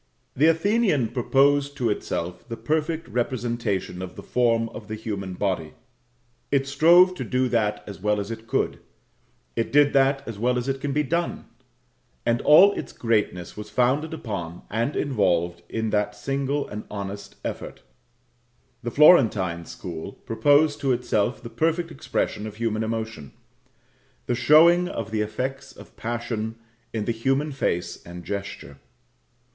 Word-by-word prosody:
The 150 +5 +4
Athenian 165 - +2
proposed 140 +4 +2
to 120 -3 +1
itself 90 -1 -4
the 115 - -5
perfect 160 +1 -1
representation 120 -6 -2
of 95 -1 -7
the - - -9
form 115 -2 +2
of 105 -2 -10
the 110 - -4
human 100 -4 -5
body. 90 -6 -2 0.7
It 135 -1 +2
strove 170 +6 +6
to 180 - -5
do 130 0 0
that 105 -3 0
as 100 -2 -9
well 105 +1 +1
as 100 +2 -4
it 115 0 -8
could; - - 0 0.8
it 115 - -1
did 145 0 +5
that 135 0 +2
as 110 -3 -6
well 125 +2 +1
as 125 +1 -2
it 135 0 -2
can 145 - -2
be 150 +2 +1
done; 170 +4 -2 0.8
and 120 0 +2
all 185 +7 +8
its - - -6
greatness 105 -6 -1
was 105 0 -8
founded 135 +6 +1
upon 95 - -5
and 115 +7 -1
involved 85 - +1
in 110 -1 -2
that 105 0 0
single 135 +6 -2
and 105 +1 -6
honest 100 0 -6
effort. - - -6 1.0
The 120 - -3
Florentine 105 - +5
school 85 +2 -7
proposed 145 +5 +2
to 135 -3 +1
itself 120 -1 0
the - - -6
perfect 165 +1 0
expression 110 -6 -2
of 105 - -8
human 110 -1 -1
emotion 110 -9 -4 0.9
the - - 0
showing 170 +7 +6
of 115 - -5
the 110 -1 0
effects 135 +6 -4
of - - -15
passion 115 -1 -3 0.4
in 110 -2 -3
the - - 0
human 135 +6 0
face 90 -10 -2
and 85 0 -10
gesture. 100 -8 -6
115 Hz, 150 wpm, -24 LUFS, 105-140 Hz, 1.0 s, all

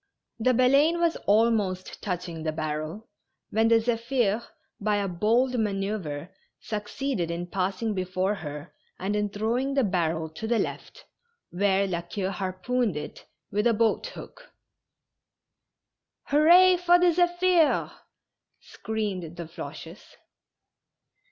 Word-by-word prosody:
The 255 +2 +3
Baleine 280 +7 +4
was 340 -1 +2
almost 205 -4 +1
touching 175 -4 -4
the 155 0 -1
barrel, 155 +6 -4 0.4
when 225 +1 +3
the 230 - +5
Zephir^ 230 -1 +1 0.4
by 210 0 +1
a 200 -1 0
bold 230 +8 +1
manoeuvre, 195 -6 -3 0.3
succeeded 210 -2 -3
in 170 +1 -3
passing 195 +4 -2
before 185 +1 -1
her 150 -4 -7 0.2
and 195 +3 -2
in 210 0 0
throw 220 +4 -1
ing 275 +1 -2
the 270 - +3
barrel 165 -5 0
to 190 +8 -6
the 235 0 +2
left, - - -5 0.5
where 195 +1 +2
La 175 -3 -2
Queue 190 +2 -4
harpooned 195 +2 -1
it 150 0 -8 0.2
with 210 +3 +1
a 230 - +3
boat 230 - +1
hook. - - -12 0.8
" - - -61
Hurrah 350 +5 +7
for 350 0 +5
the 355 -1 +4
Zephir 350 -1 +2
I - - -18 0.4
" - - -54
screamed 195 -7 -4
the 170 - -5
Floches. 160 +3 -9
210 Hz, 130 wpm, -26 LUFS, 180-250 Hz, 0.8 s, Hurrah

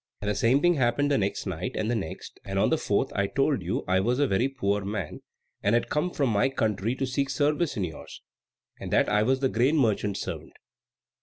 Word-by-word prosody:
And 105 0 -1
the - - 0
same 115 +7 +3
thing 175 -2 +4
happened 130 +3 +1
the 140 - +3
next 100 0 -2
night, - - -4
and 110 - -1
the 120 - 0
next, 95 -8 -6
and - - -4
on - - +2
the - - +3
fourth - - 0
I 100 0 0
told 135 -1 +1
you 90 +2 -2
I 95 +1 +3
was 120 +6 +1
a 145 - +3
very 120 +2 +1
poor 105 -7 -1
man, 100 -5 -4 0.4
and 105 +3 +2
had 120 - 0
come 150 +4 0
from 140 -8 0
my 105 +5 +2
country 110 -2 -1
to 135 - -1
seek 135 +1 -1
service 145 +2 0
in 100 - 0
yours, 80 -4 -8 0.6
and - - -6
that - - +3
I 105 - +3
was 130 +4 +1
the 135 - +3
grain 130 +8 +2
merchant's 105 -6 +1
servant. - - -6
120 Hz, 230 wpm, -27 LUFS, 100-135 Hz, 0.6 s, thing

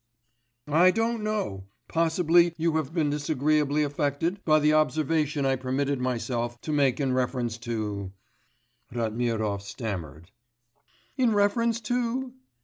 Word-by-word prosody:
'I 165 +5 +5
don't 225 +2 0
know; 200 - -2 0.2
possibly 170 +1 +3
you 165 0 0
have 155 -2 -2
been 160 -4 0
disagreeably 150 0 +1
affected 145 +6 -1
by 155 -1 +4
the 150 0 +3
observation 155 -1 +1
I 135 0 +2
permitted 130 +1 -1
myself 120 -1 -2
to 155 - -4
make 140 -3 +2
in 135 -3 0
reference 125 -2 -1
to 105 -4 -3 0.4
' 120 0 -44
Ratmirov 110 -3 -1
stammered. 95 - -6 0.9
'In 245 -5 +3
reference 225 +3 +2
to? 245 +2 -2
145 Hz, 125 wpm, -27 LUFS, 120-170 Hz, 0.9 s, I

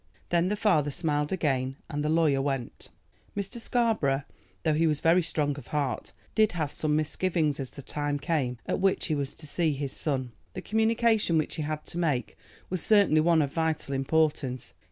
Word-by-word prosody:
Then 170 0 +2
the 205 - 0
father 180 -9 +2
smiled 150 0 -1
again, 135 -7 0
and 150 -2 -3
the 150 - 0
lawyer 155 -4 +3
went. 135 -4 -3 0.5
Mr. 200 +4 -4
Scarborough, 220 - +1 0.4
though 155 - +2
he 160 +2 +3
was 150 -2 +1
very 170 +3 +4
strong 150 -3 0
of 120 - -13
heart, 145 -3 -2 0.2
did 215 -3 +3
have 155 -4 -2
some 150 -1 0
misgivings 155 -1 0
as 135 -2 -4
the 140 - -11
time 145 +1 -2
came 140 -4 -1
at - - -1
which 190 0 +2
he 160 - -1
was 140 -2 -2
to 155 - -9
see 160 +1 0
his 140 -1 -4
son. 130 -5 -1 0.2
The 185 - -4
communication 220 -4 +2
which 155 - 0
he - - -2
had 155 0 -3
to 170 - -5
make 150 -8 0 0.3
was 185 -2 -3
certainly 200 -8 +5
one 165 -1 +4
of 140 - -4
vital 160 -4 -1
importance. 135 -2 0
155 Hz, 190 wpm, -28 LUFS, 145-175 Hz, 0.5 s, certainly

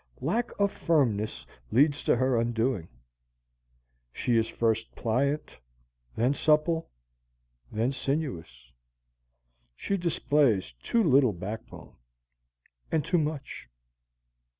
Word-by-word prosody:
Lack 240 +1 0
of 200 -1 +2
firmness 110 - 0 0.3
leads 145 +4 +3
to - - +4
her 130 +1 +1
undoing: 115 -5 0 1.2
she 120 - 0
is 115 0 +3
first 115 -1 -1
pliant, 140 +6 0 0.6
then 120 +5 +2
supple, 155 +3 +2 0.8
then 115 +4 0
sinuous. 90 - -4 1.0
She 200 - -2
displays 145 - +1
too 230 -1 +1
little 135 - +4
backbone, 105 +5 -8 1.0
and 155 -3 +1
too 175 - +2
much. 150 - -4
130 Hz, 95 wpm, -28 LUFS, 110-150 Hz, 1.2 s, to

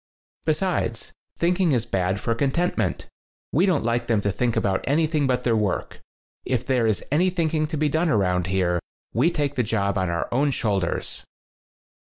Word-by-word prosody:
"Besides, 155 -8 -1 0.3
thinking 175 -1 +2
is 120 -3 +1
bad 95 -3 0
for 115 - 0
con 135 +4 +1
tentment. 130 - -1 0.5
We 175 +8 +3
don't 175 -6 +2
like 120 +1 0
them 115 -3 +2
to 100 - 0
think 120 +3 0
about 95 -1 0
anything 155 0 +2
but 125 -1 0
their 115 -2 +2
work. 105 -4 -2 0.4
If 125 -2 -1
there 125 -4 +2
is 110 - 0
any 175 +6 +3
thinking 160 -3 0
to 155 0 -4
be 150 +1 +2
done 160 +3 +1
around 90 - +1
here, 90 -2 +1 0.3
we 130 +9 +3
take 145 -4 -1
the 130 - +1
job 100 -3 0
on 95 -1 0
our 85 -1 -1
own 140 +4 +2
shoulders." 100 -9 -2
125 Hz, 180 wpm, -24 LUFS, 100-155 Hz, 0.5 s, We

